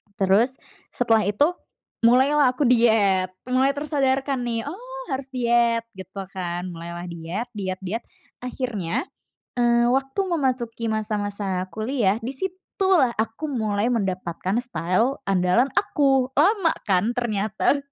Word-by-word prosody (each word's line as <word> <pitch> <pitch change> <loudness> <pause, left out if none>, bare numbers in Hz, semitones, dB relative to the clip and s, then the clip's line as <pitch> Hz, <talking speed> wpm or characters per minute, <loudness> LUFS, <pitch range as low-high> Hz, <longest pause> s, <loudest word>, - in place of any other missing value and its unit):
Terus, 205 +7 +3 0.4
setelah 225 -4 +2
itu 285 - +3 0.5
mulailah 260 +4 +4
aku 290 - 0
diet, 220 -6 +4 0.2
mulai 260 +2 +2
tersadarkan 275 -2 0
nih, 235 -2 -2
oh - - -8
harus 265 0 -3
diet 235 -1 +2
gitu 190 0 -8
kan, 175 -2 -4
mulailah 170 +1 -7
diet 170 +8 -5
diet 190 -4 -4
diet, 220 +6 -3 0.4
akhirnya, 245 - -3 0.5
eee, 240 -1 +3
waktu 270 +5 -1
memasuki 250 -8 -1
masa-masa 205 -3 -2
kuliah, 220 -2 0
di 245 +4 -5
situ 370 +6 -4 0.3
lah 265 -10 +4
aku 225 +7 -3
mulai 220 -6 -1
mendapatkan 190 -3 -1
style 240 +2 0
andalan 195 +7 +2
aku, 270 -8 +1
lama 360 +3 +3
kan 200 +4 +1
ternyata. 215 +2 0
235 Hz, 120 wpm, -23 LUFS, 200-265 Hz, 0.5 s, mulailah